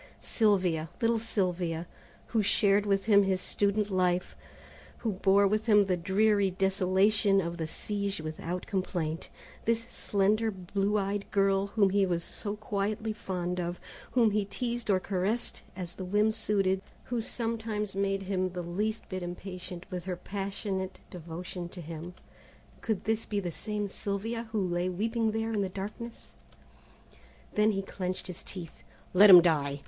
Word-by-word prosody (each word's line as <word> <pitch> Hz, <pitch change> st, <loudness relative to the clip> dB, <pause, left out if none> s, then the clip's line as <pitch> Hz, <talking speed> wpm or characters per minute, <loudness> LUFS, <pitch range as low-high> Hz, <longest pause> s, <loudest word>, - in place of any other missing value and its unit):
Sylvia, 185 Hz, -8 st, +2 dB
little 230 Hz, -1 st, +2 dB
Sylvia, 180 Hz, -6 st, -1 dB, 0.4 s
who 225 Hz, -, +2 dB
shared 205 Hz, 0 st, +3 dB
with 195 Hz, -1 st, +2 dB
him 205 Hz, -2 st, +6 dB
his 190 Hz, -1 st, +1 dB
student 205 Hz, +2 st, 0 dB
life, 180 Hz, -1 st, +1 dB, 0.6 s
who 225 Hz, -, -1 dB
bore 195 Hz, +1 st, +4 dB
with 215 Hz, +3 st, +1 dB
him 210 Hz, -2 st, +7 dB
the 190 Hz, -2 st, +1 dB
dreary 200 Hz, +3 st, +3 dB
desolation 195 Hz, +2 st, +3 dB
of 170 Hz, -2 st, -2 dB
the 160 Hz, -2 st, -2 dB
siege 200 Hz, +3 st, -2 dB
without 160 Hz, +3 st, -4 dB
complaint, 175 Hz, -5 st, -2 dB, 0.4 s
this 230 Hz, 0 st, +2 dB
slender 210 Hz, +3 st, +1 dB
blue 195 Hz, +1 st, -1 dB
eyed 200 Hz, 0 st, -2 dB
girl 195 Hz, 0 st, +2 dB
whom 200 Hz, -1 st, +3 dB
he 200 Hz, 0 st, +3 dB
was 170 Hz, -1 st, 0 dB
so 205 Hz, +3 st, -5 dB
quietly 215 Hz, +1 st, -2 dB
fond 180 Hz, -3 st, -3 dB
of, 175 Hz, 0 st, -3 dB, 0.3 s
whom 230 Hz, -4 st, +4 dB
he 210 Hz, 0 st, +1 dB
teased 235 Hz, +3 st, -3 dB
or 190 Hz, -2 st, +4 dB
caressed 195 Hz, +5 st, -2 dB
as 175 Hz, -2 st, -5 dB
the 190 Hz, -, -7 dB
whim 210 Hz, +4 st, +2 dB
suited, 200 Hz, -3 st, +1 dB, 0.2 s
who 240 Hz, -2 st, -2 dB
sometimes 225 Hz, -3 st, -2 dB
made 195 Hz, 0 st, 0 dB
him 185 Hz, -1 st, 0 dB
the 180 Hz, -1 st, -4 dB
least 210 Hz, +6 st, -2 dB
bit 185 Hz, -1 st, -4 dB
impatient 180 Hz, 0 st, -6 dB
with 180 Hz, -1 st, -4 dB
her 185 Hz, -1 st, -2 dB
passionate 195 Hz, 0 st, -3 dB
devotion 175 Hz, +1 st, -6 dB
to 180 Hz, -, -10 dB
him, 165 Hz, +2 st, -7 dB, 0.7 s
could 220 Hz, -4 st, -1 dB
this 220 Hz, 0 st, 0 dB
be 205 Hz, -, 0 dB
the 180 Hz, -3 st, -3 dB
same 210 Hz, +3 st, -3 dB
Sylvia 220 Hz, +4 st, -3 dB
who 205 Hz, -4 st, 0 dB
lay 175 Hz, +1 st, 0 dB
weeping 225 Hz, +5 st, 0 dB
there 225 Hz, +1 st, -1 dB
in 210 Hz, -, +1 dB
the 195 Hz, -, -1 dB
darkness? 210 Hz, +5 st, -7 dB, 1.2 s
Then 210 Hz, +1 st, +3 dB
he 195 Hz, 0 st, -1 dB
clinched 185 Hz, -1 st, -4 dB
his 180 Hz, -, -7 dB
teeth. 175 Hz, -4 st, -8 dB, 0.3 s
"Let 200 Hz, +3 st, +8 dB
him 180 Hz, -3 st, +11 dB
die! 145 Hz, -4 st, +1 dB
195 Hz, 155 wpm, -30 LUFS, 180-210 Hz, 1.2 s, him